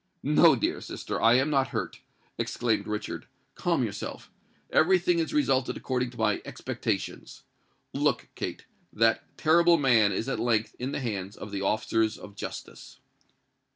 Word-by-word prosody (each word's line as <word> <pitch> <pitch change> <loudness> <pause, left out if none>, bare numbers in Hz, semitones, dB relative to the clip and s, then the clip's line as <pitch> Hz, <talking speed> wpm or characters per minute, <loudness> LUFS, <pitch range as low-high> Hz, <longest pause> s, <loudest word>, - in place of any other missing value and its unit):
"No, - - +6
dear - - -1
sister—I 115 +1 +1
am 135 +4 +2
not 135 -2 +2
hurt," - - -4 0.4
exclaimed 115 -3 0
Richard. 105 0 -4 0.3
"Calm - - 0
yourself. - - -6 0.4
Every 185 +4 +5
thing 175 -1 +1
has 165 - -1
resulted 135 - +1
according 125 -1 -1
to 120 - -14
my 110 -2 +1
expectations. - - -4 0.5
Look, - - 0
Kate—that 115 0 -2
terrible 170 +2 +5
man 120 -8 +4
is 100 +5 -2
at 135 - -2
length 115 -2 0
in 130 +2 -3
the 145 - -3
hands 100 -5 -4
of 100 - -8
the 100 -1 -3
officers 110 +2 +1
of 100 - -12
justice." - - -8
120 Hz, 145 wpm, -28 LUFS, 110-140 Hz, 0.5 s, No